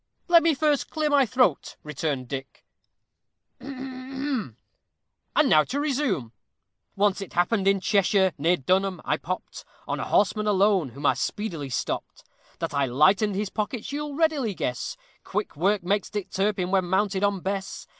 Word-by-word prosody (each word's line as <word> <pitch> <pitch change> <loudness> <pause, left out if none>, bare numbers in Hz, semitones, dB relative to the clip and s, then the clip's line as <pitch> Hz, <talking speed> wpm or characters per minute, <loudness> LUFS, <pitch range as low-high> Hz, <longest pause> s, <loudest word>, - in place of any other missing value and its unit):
"Let 345 -1 +7
me 330 -2 +3
first 295 0 +1
clear 310 -1 -1
my 275 -3 +4
throat," 235 - +1
returned 145 -3 -3
Dick; 135 +1 -7 0.9
"and 260 - -5 0.9
now 155 -1 +6
to 275 +3 -3
resume:" 260 - -1 0.6
Once 200 0 +2
it 195 - -8
happened 190 +3 +1
in 195 0 +4
Cheshire, 190 -1 +2
near 170 +5 +3
Dunham, 185 +5 +1
I 150 - +1
popped 185 +3 -6 0.2
On - - -2
a - - -2
horseman 210 +1 +2
alone, 195 -6 +3
whom 140 +5 -8
I - - +5
speedily 170 -10 -3
stopped; 125 - -4 0.3
That - - -4
I 140 -1 +1
lightened 190 - +3
his 200 0 -2
pockets 220 +3 -3
you'll 295 0 -4
readily 290 - +1
guess 125 -6 -3 0.3
Quick - - -3
work 195 +5 +1
makes 200 +3 0
Dick 205 -3 -5
Turpin 195 -2 0
when 190 -2 +2
mounted 190 +2 0
on 200 -2 +1
Bess. 195 +1 -4
200 Hz, 155 wpm, -25 LUFS, 175-255 Hz, 0.9 s, Let